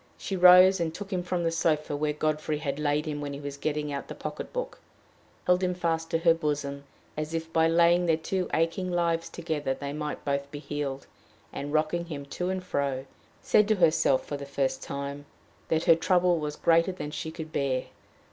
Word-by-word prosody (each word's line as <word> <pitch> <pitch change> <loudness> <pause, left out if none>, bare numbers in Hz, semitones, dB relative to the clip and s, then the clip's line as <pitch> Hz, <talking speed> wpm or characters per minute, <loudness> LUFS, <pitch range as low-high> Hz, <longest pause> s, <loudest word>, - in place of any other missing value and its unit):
She 195 - -4
rose 180 +1 +8
and 165 -1 0
took 205 -1 -6
him 180 - 0
from 175 0 -2
the 165 - +1
sofa 155 -3 0
where 150 +1 0
Godfrey 155 0 -1
had 145 -2 -3
laid 150 +1 +1
him 150 -1 -3
when 145 -1 -4
he 140 - -6
was 145 -1 -6
getting 150 0 -2
out 140 - -5
the - - -7
pocket - - -6
book, - - -4 0.7
held 180 +1 +3
him 180 -1 0
fast 165 -2 -1
to 165 - +1
her 165 0 +5
bosom, 145 -3 -3 0.3
as 155 +2 -3
if 165 0 -4
by 160 0 +4
laying 170 +1 +4
their 160 -1 +3
two 180 +3 -2
aching 165 +3 0
lives 170 -1 0
together 150 -5 -2
they 140 +1 -5
might 150 0 -5
both 140 0 -1
be 145 - -7
healed, 145 -2 -4 0.5
and, 145 +1 -5
rocking 155 +3 +1
him 145 -4 -6
to 180 +6 -3
and 185 -1 -2
fro, 140 -6 -2 0.4
said 210 - +4
to 215 - +3
herself, 160 -6 +3
for 145 - -4
the 140 - -7
first 135 -1 -1
time, 140 +1 -5 0.4
that 160 0 +1
her 165 - +6
trouble 180 0 +2
was 150 -1 -3
greater 165 +3 +3
than 165 -5 -6
she 160 - -4
could 160 -1 -8
bear. 130 -2 0
155 Hz, 205 wpm, -28 LUFS, 145-170 Hz, 0.7 s, rose